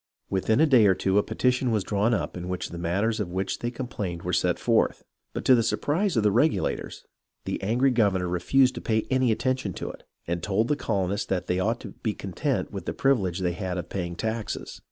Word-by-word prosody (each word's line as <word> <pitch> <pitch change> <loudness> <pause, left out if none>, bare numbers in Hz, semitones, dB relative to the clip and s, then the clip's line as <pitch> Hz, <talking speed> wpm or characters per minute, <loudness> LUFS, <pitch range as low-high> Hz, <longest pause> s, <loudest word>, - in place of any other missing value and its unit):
Within 105 +5 +2
a 160 - +6
day 125 -8 +6
or 95 - +4
two 95 +2 +2
a - - +2
petition 125 +3 +1
was 110 -4 +1
drawn 105 +4 +1
up 115 - -1
in 90 0 -5
which 90 -1 -3
the 85 - -7
matters 100 +7 0
of 100 -4 -2
which 95 +2 -2
they 120 - -2
complained 105 -8 -5
were 90 - -2
set 90 0 +2
forth; 115 -2 +1 0.3
but - - -5
to 130 - +7
the 120 - +5
surprise 160 - 0
of 110 - +3
the 105 - +4
Regulators, 145 +9 0 0.4
the - - -3
angry 120 +7 +2
governor 100 -7 +2
re 90 0 -1
fused 130 +7 +4
to - - -6
pay 110 -1 0
any 130 -2 +3
attention 130 -3 -1
to - - -5
it, - - -14 0.2
and 85 0 -2
told 105 +5 0
the 150 - +3
colonists 100 -6 -1
that 95 -2 -1
they 90 - 0
ought 115 +5 0
to - - -7
be 110 -3 -1
content 125 - -2
with 95 -3 -7
the - - -1
privilege 100 -10 +1
they 90 -1 0
had 90 -1 -3
of 90 - -5
paying 85 -3 -3
taxes. 110 +2 -4
105 Hz, 230 wpm, -26 LUFS, 90-120 Hz, 0.4 s, to